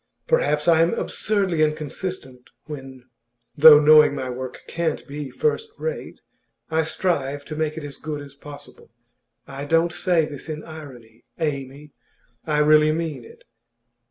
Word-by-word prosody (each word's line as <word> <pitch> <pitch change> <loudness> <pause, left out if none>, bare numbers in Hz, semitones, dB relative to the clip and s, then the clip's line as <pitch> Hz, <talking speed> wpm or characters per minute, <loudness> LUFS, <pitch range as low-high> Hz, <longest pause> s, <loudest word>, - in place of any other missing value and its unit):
Perhaps 150 - +1
I 165 -1 +5
am 165 +1 +2
absurdly 195 -6 -1
inconsistent 155 -3 -3 0.2
when 135 -4 -9 0.5
though 150 0 +9
knowing 150 -1 +6
my 130 -2 -4
work 130 0 -7
can't 165 -2 -3
be 145 -1 -6
first 450 - -1
rate 480 - -5 0.5
I 160 0 +1
strive 145 -5 -2
to 155 - -7
make 155 0 -2
it 160 - -5
as 145 -1 -8
good 150 -1 -5
as 140 -1 -13
possible. 145 0 -13 0.6
I 140 +1 -7
don't 165 +3 +2
say 175 -4 +1
this 150 +1 -9
in 155 0 -5
irony, 125 -8 -12
Amy; 145 -2 -4 0.6
I 150 -1 +2
really 150 0 +5
mean 155 -5 -3
it. - - -16
150 Hz, 145 wpm, -23 LUFS, 140-160 Hz, 0.6 s, though